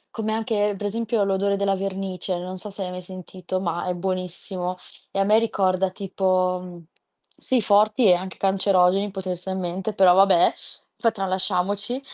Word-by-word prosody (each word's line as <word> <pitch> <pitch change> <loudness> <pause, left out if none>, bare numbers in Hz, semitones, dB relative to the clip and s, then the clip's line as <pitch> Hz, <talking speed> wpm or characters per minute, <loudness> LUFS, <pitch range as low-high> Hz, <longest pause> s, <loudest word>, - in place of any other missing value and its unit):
Come 220 -1 -2
anche, 210 -2 0
per 205 - -5
esempio, 225 +1 0
l'odore 200 0 +1
della 200 0 +1
vernice, 190 -1 -3
non 180 +1 -6
so 210 - -6
se 200 0 -6
l'hai 180 - -5
mai 180 0 -6
sentito, 185 0 -6
ma 175 -1 -2
è 180 - -1
buonissimo, 185 0 -4 0.3
e - - -6
a 195 - +3
me 215 +3 +4
ricorda 190 -4 +1
tipo, 185 -1 0
mhmm 175 -2 -10 0.5
Sì, 260 - 0
forti 210 +3 +3
e 185 - +7
anche 185 +2 -3
cancerogeni 195 0 +2
potenzialmente, 190 +1 -4
però, 185 -3 +6
vabbè, 190 -2 +5 0.4
fa 230 - +2
tralasciamoci. 195 +3 -1
190 Hz, 160 wpm, -24 LUFS, 185-205 Hz, 0.5 s, e